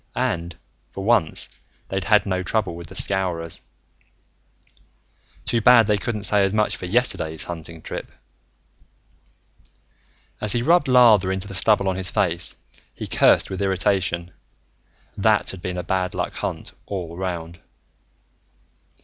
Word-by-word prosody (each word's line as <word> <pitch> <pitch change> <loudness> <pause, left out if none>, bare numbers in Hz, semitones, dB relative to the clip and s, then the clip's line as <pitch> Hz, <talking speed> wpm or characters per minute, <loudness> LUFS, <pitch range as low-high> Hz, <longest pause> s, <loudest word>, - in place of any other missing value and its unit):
And, 85 -10 -2 0.3
for 95 - -7
once, 100 -7 +3 0.4
they'd 95 -1 -2
had 105 -1 +4
no 95 -2 -1
trouble 95 -1 -1
with 85 0 -8
the - - -12
Scowrers. 90 -4 0 1.8
Too 115 - 0
bad 120 0 +7
they 105 -1 +1
couldn't 110 -1 -4
say 105 -1 +3
as 95 +1 0
much 105 -1 +1
for 90 - -7
yesterday's 90 -7 0
hunting 80 -1 -8
trip! - - -6 2.3
As 105 -1 -1
he 120 - 0
rubbed 170 +1 +3
lather 115 -7 +5
into 95 +1 -3
the 100 - -8
stubble 100 +1 +2
on 95 -1 0
his 95 -2 -3
face, 85 -2 0 0.4
he - - -6
cursed - - +3
with 95 - -4
irritation. 95 -2 0 0.8
That - - +2
had 95 - -10
been 90 0 -4
a 90 - -3
bad 95 -1 -1
luck - - -2
hunt, - - -5 0.2
all 90 -4 -5
around. 85 -2 -5
95 Hz, 140 wpm, -22 LUFS, 85-105 Hz, 2.3 s, bad